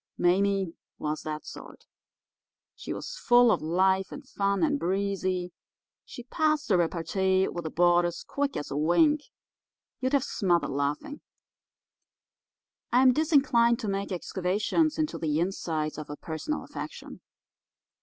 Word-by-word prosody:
"Mame 190 0 +2 0.2
was 150 0 -3
that 155 0 -5
sort. - - -11 0.9
She - - -7
was - - -6
full 245 - +5
of - - +1
life 190 +4 +1
and 280 -1 -9
fun, 200 +1 0
and 295 -2 +1
breezy; 185 -2 -1 0.5
she 245 - -10
passed 305 +2 0
the 190 - +4
repartee 190 +3 +1
with 175 -1 -5
the - - -2
boarders 175 +1 +2
quick 280 -1 -2
as 145 - -5
a - - -3
wink; 285 - +3 0.8
you'd 260 +1 -1
have 280 -3 +3
smothered 180 - 0
laughing. 145 - -3 1.7
I 250 +2 +5
am 255 -1 +6
disinclined 265 -6 +3
to 220 - -3
make 195 0 -2
excavations 200 - 0
into 310 -1 -2
the 155 -1 0
insides 160 -4 -2
of 150 - -8
a 145 - -6
personal 165 - -4
affection. - - -8
190 Hz, 135 wpm, -28 LUFS, 170-260 Hz, 1.7 s, am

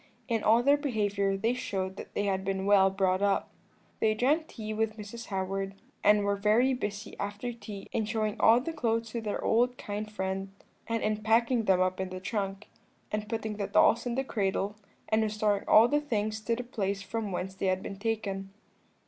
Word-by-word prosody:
In 230 -3 0
all 230 +3 +4
their 285 +2 +5
behaviour 205 -8 0
they 225 +5 +1
showed 190 -6 -3
that - - -9
they 205 - +1
had 190 -1 0
been 195 0 -2
well 195 -1 +6
brought 190 -1 +1
up. 200 -1 +1 0.5
"They 215 -1 +2
drank 295 +8 +2
tea 215 -6 -6
with 220 0 -1
Mrs. 220 +2 -8
Howard, 195 0 -2 0.3
and 210 0 +5
were 200 0 +1
very 215 +6 +3
busy 210 -3 -4
after 205 +4 -3
tea 210 -4 -8
in 220 - 0
showing 215 -1 -1
all 230 +2 +7
the 325 +6 -4
clothes 230 -5 0
to 235 - -3
their 210 -2 -3
old 245 +2 +2
kind 210 +1 -5
friend, 190 -1 -3 0.4
and 230 0 -1
in 215 0 +1
packing 230 +2 +2
them 190 -2 +4
up 185 0 +1
in 190 -1 -2
the 185 0 -6
trunk, 195 0 -3 0.4
and 210 0 -3
putting 220 -2 -3
the 200 -2 -2
dolls 235 +2 +4
in 235 - -1
the 270 - 0
cradle, 200 -3 -1 0.3
and 220 0 +2
restoring 210 -1 0
all 220 +2 +7
the 295 +3 +1
things 215 -6 -2
to 230 - +1
the 245 - -4
place 200 -5 -2
from 220 0 -3
whence 185 +1 -3
they 190 0 -2
had 185 0 0
been 195 -1 -7
taken. 200 -3 -2
210 Hz, 200 wpm, -29 LUFS, 195-230 Hz, 0.5 s, all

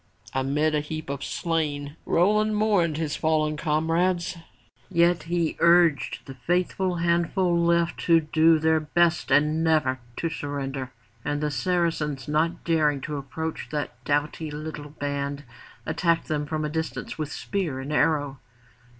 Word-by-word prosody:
Amidst 140 +4 +1
a 150 - +2
heap 150 -1 -5
of 140 -1 -5
slain 150 -3 -2
Roland 210 +5 +3
mourned 200 -7 +2
his 155 -2 -2
fallen 155 -1 +1
comrades, 165 +4 0 0.5
yet 170 +1 +3
he 170 -2 0
urged 170 -4 +3
the 135 - -8
faithful 180 +6 0
handful 170 +1 +1
left 170 0 +2
to 165 -1 +6
do 160 +1 +4
their 160 0 +3
best 170 +2 +1
and 150 +3 +3
never 150 -5 +2 0.2
to 165 - -2
surrender. 140 -4 -4 0.3
And 145 0 -1
the 150 0 -1
Saracens 150 -2 -1
not 160 +3 0
daring 155 -4 +2
to 150 +1 -4
approach 160 +4 -5
that 145 -5 -4
doughty 150 +3 -1
little 150 0 -6
band, 140 -1 -3 0.4
attacked 165 +1 +1
them 150 -1 -2
from 155 -1 -2
a - - -2
distance 160 +1 -4
with 150 -1 -3
spear 170 -9 -3
and 140 +3 -5
arrow. 145 -4 +1
155 Hz, 140 wpm, -25 LUFS, 145-170 Hz, 0.5 s, to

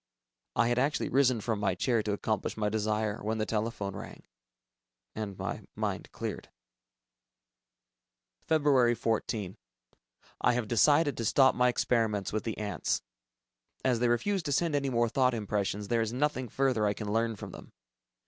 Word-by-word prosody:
I 115 - +3
had 120 0 +2
actually 145 +3 0
risen 130 -4 +3
from 110 -1 -1
my 100 -3 +1
chair 115 +5 +1
to 105 - -2
accomplish 105 0 -2
my 105 -1 0
desire, 110 0 -1
when 110 +2 -1
the 110 - 0
telephone 105 -3 -2
rang... - - -9 0.9
and 105 -3 -5
my - - -4
mind - - -3
cleared. - - -5 2.0
Feb. 140 -7 +4
14. 105 -4 -2 0.8
I 125 - +4
have 120 -2 -1
decided 145 +4 +4
to 115 - -2
stop 130 +4 +5
my 125 0 +3
experiments 115 -5 +1
with 110 - -2
the 115 - -3
ants. 100 -6 -2 0.8
As 125 -3 +2
they 120 - +2
refuse 190 +12 +1
to 150 - -4
send 165 +3 +1
any 140 -1 +1
more 120 -2 +2
thought 125 +1 +2
impressions, 105 -1 -2
there 115 +2 +1
is 110 -1 -1
nothing 130 -1 -1
further 125 -4 +1
I 100 - 0
can 105 0 -4
learn 115 0 +1
from - - -8
them. - - -12
115 Hz, 160 wpm, -30 LUFS, 105-130 Hz, 2.0 s, stop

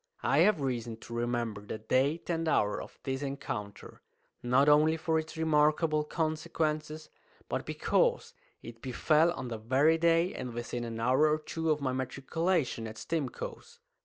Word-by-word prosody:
I 140 - +3
have 180 -2 +4
reason 120 -4 -2
to 115 - -11
remember 120 -3 -2
the 105 +1 -6
date 130 +8 0
and 165 -1 -1
hour 105 -9 +1
of - - -11
this 135 0 -3
encounter, 135 -7 -6 0.4
not 125 +4 +3
only 155 +2 +5
for 160 0 +1
its 160 +1 -7
remarkable 155 0 +2
consequences, 155 -1 -2 0.4
but - - -3
because - - +1 0.3
it 115 0 -10
befell 155 +5 +2
on 130 -6 -6
the 115 -2 -5
very 135 +8 +3
day 170 +2 +3
and 125 -2 -6
within 120 0 -4
an 115 -1 -5
hour 130 +6 +3
or 155 - +2
two 160 +1 -3
of 150 -1 +1
my 130 -2 -1
matriculation 135 0 -1
at 110 0 -9
Stimcoe's. 460 - -5
150 Hz, 160 wpm, -30 LUFS, 120-160 Hz, 0.4 s, only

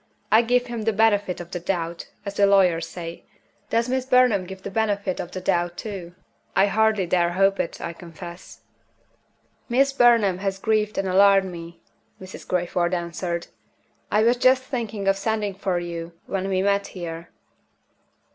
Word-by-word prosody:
I 220 - +7
give 245 +1 +1
him 240 -2 -5
the 225 +1 0
benefit 205 -3 +2
of 175 0 -9
the 175 - -3
doubt, 170 -1 -3 0.2
as 200 - -4
the 200 0 +3
lawyers 180 -5 +3
say. 170 -1 -8 0.5
Does 230 +1 +1
Miss 260 0 0
Burnham 250 -7 +3
give 190 +1 -8
him - - -29
the 200 - -5
benefit 205 -3 -1
of 175 - -4
the 185 - -6
doubt 175 -2 0
too? 185 -5 -7 0.4
I 195 - +5
hardly 215 -1 +2
dare 175 0 +1
hope 195 +1 +2
it, - - -3
I 170 - -5
confess." 170 +1 -11 1.1
"Miss 270 +3 +3
Burnham 230 -8 +4
has 195 0 -2
grieved 215 +1 0
and 195 - 0
alarmed 195 0 +4
me," 170 0 -10 0.4
Mrs. 185 0 -10
Crayford 175 0 0
answered. 170 0 -3 0.7
"I 210 +1 +3
was 240 +2 +3
just 255 +1 +4
thinking 225 -6 -4
of 195 0 +3
sending 210 -1 -1
for 190 -1 -2
you 170 -1 -5
when 195 -1 -3
we 190 0 +1
met 200 0 +1
here." 170 -2 -7
195 Hz, 170 wpm, -24 LUFS, 175-220 Hz, 1.1 s, I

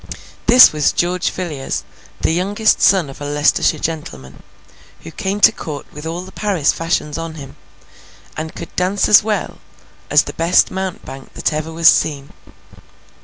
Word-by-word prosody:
This 250 -4 +8
was 150 -1 +1
George 180 +1 0
Villiers, 155 -7 -5 0.4
the - - +1
youngest 200 +6 +1
son 190 -6 +4
of 135 +1 -12
a - - -5
Leicestershire 145 +2 +1
gentleman: 145 - -6 0.6
who 165 - -10
came 200 +3 -3
to - - +7
Court 145 -3 -7
with 150 +2 -8
all 170 +2 -4
the 185 +1 -11
Paris 190 -8 0
fashions 165 -2 -2
on 165 -1 -6
him, 140 -4 -10 0.8
and 155 +1 -6
could - - -9
dance 185 +2 0
as 210 - +7
well 215 0 -3 0.5
as - - +4
the - - -8
best 170 +2 +2
mountebank 185 -8 -7
that - - -1
ever 155 +1 -4
was 165 0 +2
seen. 140 -3 +2
165 Hz, 160 wpm, -17 LUFS, 150-185 Hz, 0.8 s, This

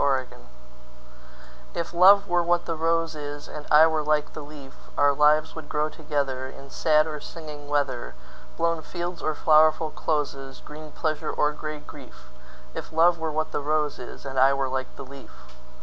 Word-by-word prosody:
A - - +2
Match 130 -2 +1 1.5
IF 170 - -3
love 200 +3 +7
were 175 -1 +2
what 175 0 +1
the 165 - -2
rose 165 +1 0
is, 145 -1 -7
And 150 -1 -9
I 150 +1 +8
were 160 -1 +1
like 150 0 0
the 155 - -7
leaf, 145 -2 -11 0.2
Our 145 0 +4
lives 150 +2 +3
would 160 -2 -9
grow 150 +1 0
togetherIn 140 -3 -4
sad 155 -1 +3
or 155 -2 -5
singing 150 -3 -9
weather, 130 - -1 0.4
Blown 165 -1 0
fields 175 +2 -5
or 155 - -1
flowerful 155 0 +4
closes, 140 -3 -3
Green 155 0 -11
pleasure 155 -1 -2
or 150 - +1
gray 155 0 -6
grief; - - -14 0.4
If - - -7
love 170 +2 +4
were 160 -1 -2
what 155 +1 -2
the - - -2
rose 150 0 0
is, 125 +3 -10
And 135 -1 -2
I 135 +1 +6
were 135 -1 -1
like 130 0 -4
the 140 - -9
leaf. 135 0 -12
150 Hz, 180 wpm, -25 LUFS, 140-160 Hz, 1.5 s, I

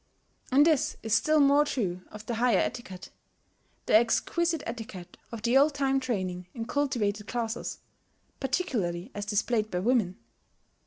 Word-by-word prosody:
And 285 +3 +6
this 315 -5 +2
is 220 -1 -1
still 310 +7 +4
more 285 +1 +5
true 195 -11 -2
of 210 0 -10
the 235 - -3
higher 230 -2 +3
etiquette, 190 -4 -4 0.7
the - - +3
exquisite 320 +8 +2
etiquette 225 -6 -7 0.2
of 230 -2 -7
the 235 +3 +2
old 285 +2 +5
time 270 -1 +1
training 185 -8 -3
in 230 -2 -4
cultivated 215 -7 -1
classes, 235 -1 -3 0.6
particularly 240 - -2
as 205 0 -5
displayed 215 +1 0
by 180 - -3
women. 205 -2 +1
230 Hz, 145 wpm, -28 LUFS, 205-270 Hz, 0.7 s, And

